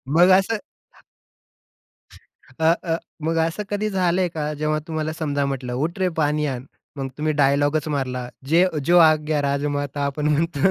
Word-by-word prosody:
मग 175 Hz, +2 st, +6 dB
असं 205 Hz, +4 st, 0 dB, 2.0 s
अ, 160 Hz, +1 st, +5 dB
अ, 165 Hz, -2 st, 0 dB, 0.3 s
मग 165 Hz, +1 st, 0 dB
असं 165 Hz, +6 st, -4 dB
कधी 205 Hz, +1 st, -1 dB
झालंय 185 Hz, -1 st, +1 dB
का? 150 Hz, -2 st, -3 dB
जेव्हा 155 Hz, +1 st, -1 dB
तुम्हाला 155 Hz, -1 st, -2 dB
समजा 145 Hz, -3 st, -1 dB
म्हटलं, 130 Hz, -3 st, -4 dB
"उठ 160 Hz, +9 st, -2 dB
रे, 185 Hz, -, +2 dB
पाणी 150 Hz, 0 st, +1 dB
आण" 130 Hz, -3 st, -4 dB, 0.3 s
मग 135 Hz, -1 st, -3 dB
तुम्ही 155 Hz, +1 st, 0 dB
डायलॉगच 145 Hz, +2 st, +2 dB
मारला, 130 Hz, -4 st, -2 dB, 0.2 s
"जे 170 Hz, +3 st, +5 dB
अ, 180 Hz, -4 st, -2 dB
जो 175 Hz, +4 st, +5 dB
आग्या 155 Hz, -1 st, +1 dB
राजमाता" 145 Hz, 0 st, -1 dB
आपण 150 Hz, +2 st, -1 dB
म्हणतो. 160 Hz, +2 st, +2 dB
155 Hz, 155 wpm, -22 LUFS, 145-165 Hz, 2.0 s, मग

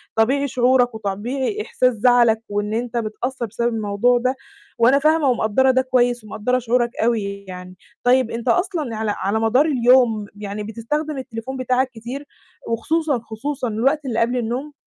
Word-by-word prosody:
طبيعي 270 Hz, +6 st, +2 dB
شعورك 250 Hz, -1 st, +2 dB
وطبيعي 240 Hz, -, -3 dB
إحساس 255 Hz, -10 st, +1 dB
زعلك 235 Hz, 0 st, +3 dB
وإن 205 Hz, +1 st, -2 dB
أنت 240 Hz, +1 st, -2 dB
متأثّر 235 Hz, +3 st, -3 dB
بسبب 235 Hz, +2 st, -2 dB
الموضوع 220 Hz, +3 st, +1 dB
ده، 255 Hz, +2 st, 0 dB, 0.4 s
وأنا 250 Hz, +4 st, +5 dB
فاهمة 310 Hz, 0 st, +3 dB
ومقدّرة 250 Hz, +2 st, +2 dB
ده 260 Hz, -, +3 dB
كويس 245 Hz, -2 st, +1 dB
ومقدّرة 215 Hz, +4 st, -1 dB
شعورك 240 Hz, 0 st, 0 dB
أوي 200 Hz, -4 st, -1 dB
يعني. 180 Hz, 0 st, -9 dB, 0.3 s
طيب 250 Hz, -1 st, +3 dB
أنت 230 Hz, +2 st, -5 dB
أصلًا 330 Hz, -, 0 dB
على 215 Hz, -1 st, -1 dB
على 200 Hz, +4 st, -1 dB
مدار 230 Hz, +6 st, +3 dB
اليوم 245 Hz, -6 st, +3 dB
يعني 205 Hz, 0 st, -6 dB
بتستخدم 275 Hz, +8 st, -3 dB
التليفون 260 Hz, 0 st, -6 dB
بتاعك 255 Hz, +1 st, +1 dB
كتير 240 Hz, +5 st, -7 dB, 0.4 s
وخصوصًا، 290 Hz, +4 st, 0 dB
خصوصًا 245 Hz, +4 st, -4 dB
الوقت 270 Hz, +7 st, 0 dB
اللي 235 Hz, -4 st, -1 dB
قبل 240 Hz, +2 st, +1 dB
النوم؟ 250 Hz, +5 st, -3 dB
240 Hz, 155 wpm, -21 LUFS, 220-260 Hz, 0.4 s, وأنا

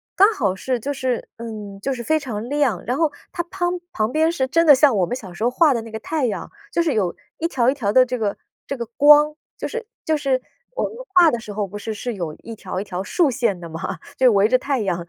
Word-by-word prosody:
刚 405 Hz, +4 st, +6 dB
好 190 Hz, -, 0 dB
是 255 Hz, +6 st, -1 dB
就 280 Hz, +6 st, -3 dB
是 260 Hz, -3 st, -2 dB
嗯， 210 Hz, -4 st, -7 dB
就 270 Hz, +3 st, -1 dB
是 240 Hz, -2 st, -5 dB
非 315 Hz, +5 st, +2 dB
常 230 Hz, -6 st, -5 dB
亮， 280 Hz, -10 st, +1 dB
然 250 Hz, +3 st, -1 dB
后 320 Hz, -3 st, +2 dB, 0.2 s
它 345 Hz, -, -2 dB
乓 355 Hz, -1 st, -2 dB
旁 215 Hz, +2 st, 0 dB
边 315 Hz, +1 st, +3 dB
是 265 Hz, -6 st, 0 dB
真 330 Hz, +5 st, +3 dB
的 290 Hz, -, +10 dB
像 270 Hz, -3 st, +4 dB
我 180 Hz, -, +3 dB
们 245 Hz, -, -3 dB
小 190 Hz, -8 st, -9 dB
时 175 Hz, -, -12 dB
候 240 Hz, -, +4 dB
画 290 Hz, +2 st, +4 dB
的 235 Hz, -, -1 dB
那 225 Hz, -, -10 dB
个 220 Hz, -, -4 dB
太 310 Hz, 0 st, -1 dB
阳， 215 Hz, -4 st, -3 dB, 0.2 s
就 340 Hz, -, +2 dB
是 315 Hz, -, +1 dB
有 185 Hz, -5 st, 0 dB, 0.2 s
一 330 Hz, -, 0 dB
条 255 Hz, -6 st, +2 dB
一 -, -, +3 dB
条 215 Hz, -8 st, -1 dB
的 255 Hz, -1 st, +7 dB
这 250 Hz, 0 st, -3 dB
个 210 Hz, -3 st, -1 dB, 0.3 s
这 275 Hz, -, -2 dB
个 235 Hz, -, -3 dB
光， 295 Hz, +1 st, +7 dB, 0.2 s
就 -, -, -3 dB
是 475 Hz, -1 st, -5 dB, 0.2 s
就 315 Hz, -2 st, +2 dB
是 265 Hz, -3 st, 0 dB, 0.3 s
我 -, -, 0 dB
们 -, -, -3 dB, 0.2 s
画 345 Hz, -4 st, +7 dB
的 240 Hz, -, -1 dB
时 210 Hz, -2 st, -8 dB
候 210 Hz, 0 st, -1 dB
不 200 Hz, +2 st, -8 dB
是 220 Hz, +1 st, -4 dB
是 240 Hz, +3 st, -4 dB
有 170 Hz, -7 st, -4 dB
一 230 Hz, -, -7 dB
条 185 Hz, -2 st, -5 dB
一 -, -, -3 dB
条 185 Hz, -3 st, -4 dB
竖 285 Hz, -, +1 dB
线 230 Hz, -6 st, 0 dB
的 170 Hz, -1 st, -9 dB
吗？ 160 Hz, +1 st, -5 dB, 0.2 s
就 255 Hz, -1 st, +6 dB
围 200 Hz, +1 st, +4 dB
着 255 Hz, +2 st, +4 dB
太 275 Hz, 0 st, -1 dB
阳 180 Hz, -4 st, -1 dB
250 Hz, 285 characters per minute, -22 LUFS, 210-295 Hz, 0.3 s, 的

